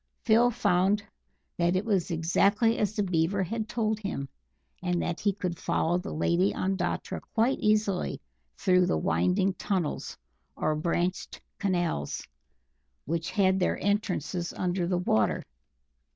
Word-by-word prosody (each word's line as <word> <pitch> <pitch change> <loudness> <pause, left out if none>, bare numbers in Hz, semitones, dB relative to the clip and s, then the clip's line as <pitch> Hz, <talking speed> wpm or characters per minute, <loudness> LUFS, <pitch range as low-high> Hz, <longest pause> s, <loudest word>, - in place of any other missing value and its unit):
Phil 235 +1 +5
found 205 -3 +2 0.6
that 175 +1 +2
it 190 +4 0
was 195 -6 +1
exactly 195 +7 +2
as 210 0 0
the 205 - +1
Beaver 185 +1 +1
had 220 +4 -3
told 220 -2 0
him, 195 -9 -4 0.5
and 180 -1 0
that 175 0 -2
he 205 - +2
could 180 -3 -4
follow 175 +2 +1
the 190 - -6
Lady 170 +4 +2
Ondatra 185 -2 -2
quite 235 +4 +2
easily 210 -3 +1 0.4
through 180 -2 +3
the - - +1
winding 90 - +1
tunnels, 185 -4 -2 0.4
or 155 - 0
branched 175 +3 -1 0.2
canals, 175 - -1 0.8
which 165 +2 -2
had 190 -2 +2
their 180 - +1
entrances 180 -4 -1
under 180 -1 -1
the 180 0 +1
water. 110 - +1
185 Hz, 135 wpm, -28 LUFS, 170-205 Hz, 0.8 s, Phil